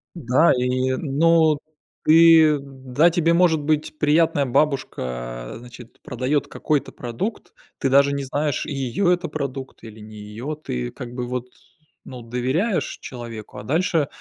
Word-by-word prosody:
Да, 145 +1 +3
и 130 +1 0
ну, 160 +2 +3 0.5
ты 160 -1 +7
да, 135 +3 +1
тебе, 170 -1 +2
может 170 -2 +3
быть, 155 +1 -1
приятная 150 -1 +3
бабушка, 65 - -2
значит, 120 0 -13
продает 130 +4 -1
какой-то 150 -3 -2
продукт, 125 - -5 0.3
ты 135 - 0
даже 140 +1 +4
не 140 0 -2
знаешь, 145 +1 -2
ее 140 +6 0
это 175 -1 -2
продукт 140 -3 -6
или 110 -1 -11
не 110 0 -12
ее. 110 +8 -6
Ты - - -4
как 120 -1 -9
бы 125 0 -4
вот, 125 0 -4 0.6
ну, 125 -1 -9
доверяешь 130 - -1
человеку, 120 -4 -9
а - - -7
дальше 160 - +1
135 Hz, 140 wpm, -22 LUFS, 125-155 Hz, 0.6 s, ты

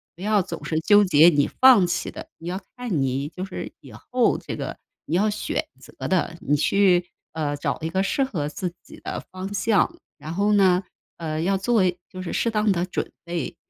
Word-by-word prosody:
不 175 - -14
要 210 -1 +2
总 - - -7
是 155 - -1
纠 205 +5 +5
结 165 -2 +7
你 145 -4 +2
放 250 -8 +6
弃 175 +2 -2
的， - - -9
你 165 - -10
要 185 +3 -3 0.2
看 225 - -1
你 135 +2 -1
就 180 +4 -6
是 190 - -6
以 - - -13
后 250 -1 +1
这 - - -6
个 - - -5 0.3
你 160 - -1
要 210 +4 +3
选 215 - -2
择 - - -8
的。 170 -2 0
你 145 - +1
去， 180 +3 +3 0.3
呃， 150 -2 -2
找 - - -2
一 160 - -2
个 190 +3 0
适 270 +7 +1
合 175 - -2
自 180 +2 -4
己 - - -14
的 - - -4
方 190 +2 -6
向， 205 0 +2 0.2
然 155 - -7
后 200 +4 +1
呢， 190 -2 +4 0.3
呃， 155 -2 -3
要 195 +2 +2
做 220 0 +2 0.3
就 185 - -8
是 175 - -5
适 230 - +1
当 210 -1 +2
的 175 -1 0
准 185 - -4
备， 170 -4 -4
185 Hz, 225 characters per minute, -24 LUFS, 165-205 Hz, 0.3 s, 结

